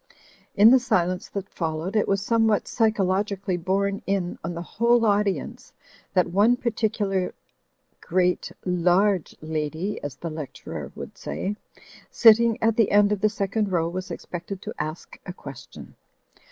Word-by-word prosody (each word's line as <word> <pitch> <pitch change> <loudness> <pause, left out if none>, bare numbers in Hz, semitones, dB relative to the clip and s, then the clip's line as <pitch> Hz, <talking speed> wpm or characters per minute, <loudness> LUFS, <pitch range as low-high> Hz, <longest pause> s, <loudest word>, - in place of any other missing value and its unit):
In 210 +3 +8
the 260 - +7
silence 185 -7 0
that 200 -1 -5
followed 165 +3 -4
it 215 - +2
was 195 0 +1
somehow 225 -1 +3
psy 225 -2 +2
chologically 195 -1 -1
borne 200 +2 0
in 190 -2 -1
on 170 +1 -4
the 170 - -5
whole 235 +5 +2
audience 205 -2 -1 0.4
that 180 -2 +2
one 210 +6 +4
particular 210 -5 -1 0.7
great 180 +1 0
large 180 +1 +2
lady 160 +5 -3
(as 145 -2 -5
the 165 +3 -6
lecturer 155 -3 -7
would - - -9
say) 200 +2 -3 0.5
sitting 230 0 +5
at 225 -1 +2
the 225 -4 +4
end 205 0 +4
of 205 -2 -1
the 215 - +4
second 205 0 -1
row 165 -2 +1
was 185 +2 -5
expected 175 +2 -6
to - - -5
ask 155 +2 -6
a 180 - -5
question. 140 -7 -11
195 Hz, 150 wpm, -24 LUFS, 175-210 Hz, 0.7 s, In